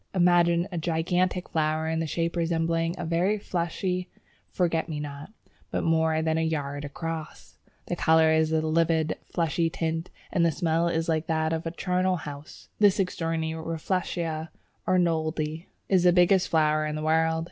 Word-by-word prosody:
Imagine 175 -1 +4
a 175 - -2
gigantic 175 +3 0
flower 155 0 0
in 160 0 0
shape 170 +2 -2
resembling 165 0 0
a - - -4
very 175 +6 +1
fleshy 180 0 -2 0.4
forget 165 -2 0
me 150 -2 -3
not, 145 +4 -7 0.4
but - - -2
more 160 -1 +2
than 160 0 +1
a - - +1
yard 145 -3 -2
across! 160 +2 -6 0.3
The - - -2
colour 160 0 +4
is 160 0 +2
a 160 0 +2
livid, 160 0 +1 0.2
fleshy 165 -1 0
tint, 165 +1 -3 0.2
and 180 -3 +2
the 170 - +4
smell 165 +1 +1
is 165 -1 -1
like 160 -1 0
that 160 0 0
of 160 +1 -3
a - - -2
charnel 180 +1 0
house. 150 -2 -9
This 205 -1 +4
extraordinary 165 -3 -1
Rafflesia 165 -1 -2 0.4
Arnoldii 160 -2 0 0.2
is 190 -2 +3
the 180 0 +5
biggest 180 +1 +4
flower 155 -1 +2
in 150 - -3
the 155 - -4
world. 160 +1 +2
165 Hz, 160 wpm, -27 LUFS, 160-175 Hz, 0.4 s, the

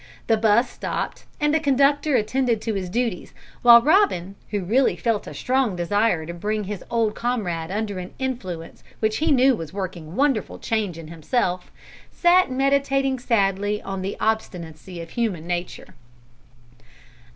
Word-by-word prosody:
The 225 - +3
'bus 220 +2 +3
stopped, - - -5
and 295 0 +2
the 315 - +3
conductor 285 0 +2
attended 235 +1 +1
to 225 - -1
his 190 -3 -3
duties, 230 -3 -2 0.3
while 235 -1 +8
Robin, 295 - +3 0.2
who 205 -2 -2
really 245 +9 +2
felt 225 -3 -1
a - - -7
strong 255 -6 0
desire 180 -1 +1
to 170 - -6
bring 210 +5 -2
his 205 -1 -6
old 225 -2 +1
comrade 195 -10 -2
under 205 -1 -3
an 180 0 -8
influence 185 -11 -5 0.2
which 220 -1 0
he 315 +1 +1
knew 265 -1 +5
was 165 -4 -7
working 185 -5 -5
a 165 - -10
wonderful 270 -4 +1
change 210 -7 -2
in 160 -2 -9
himself, 180 - -2 0.4
sat 360 -1 +4
meditating 270 0 +1
sadly 205 -3 +1
on 195 -1 -4
the 195 +2 -4
obstinacy 180 -6 -3
of 165 - -10
human 205 -9 -2
nature. 175 0 -5
215 Hz, 155 wpm, -23 LUFS, 180-255 Hz, 0.4 s, while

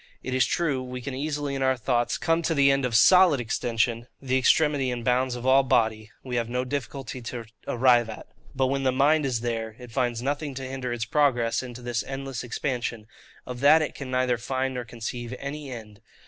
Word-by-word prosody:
It 130 - -4
is 130 -1 +3
true, 150 -7 0
we 125 0 -6
can 135 +2 -6
easily 145 +1 -3
in 135 - -3
our 130 -1 +2
thoughts 120 0 0
come 165 0 +1
to 165 0 0
the 140 -1 +5
end 135 -1 +1
of 120 -3 -1
SOLID 180 +2 +6
extension; 115 0 -1
the 130 -1 -1
extremity 140 +1 +3
and 120 -2 -4
bounds 125 0 +1
of 120 0 -7
all 135 +1 +6
body 110 -4 +1
we 125 -2 -3
have 115 -1 -1
no 125 +1 -1
difficulty 135 -1 -5
to 115 0 -6 0.2
arrive 120 -2 +3
at: 110 - -8 0.3
but 135 0 +2
when 135 +1 0
the 130 -1 +2
mind 145 +3 +3
is 120 -4 -1
there, 115 -2 -3
it 125 -2 -11
finds 120 -1 -1
nothing 145 0 -2
to 135 - -5
hinder 130 -1 -4
its 120 -2 -2
progress 120 -3 +2
into 125 -1 -9
this 120 -1 -2
endless 135 -2 -5
expansion; 120 -3 -3 0.4
of 125 -1 -6
that 155 +4 +6
it - - -4
can 135 -2 -7
neither 130 -1 +1
find 130 +2 -2
nor 125 -1 -4
conceive 120 +1 -6
any 140 +1 -6
end. 110 -4 -9
130 Hz, 210 wpm, -26 LUFS, 120-135 Hz, 0.4 s, SOLID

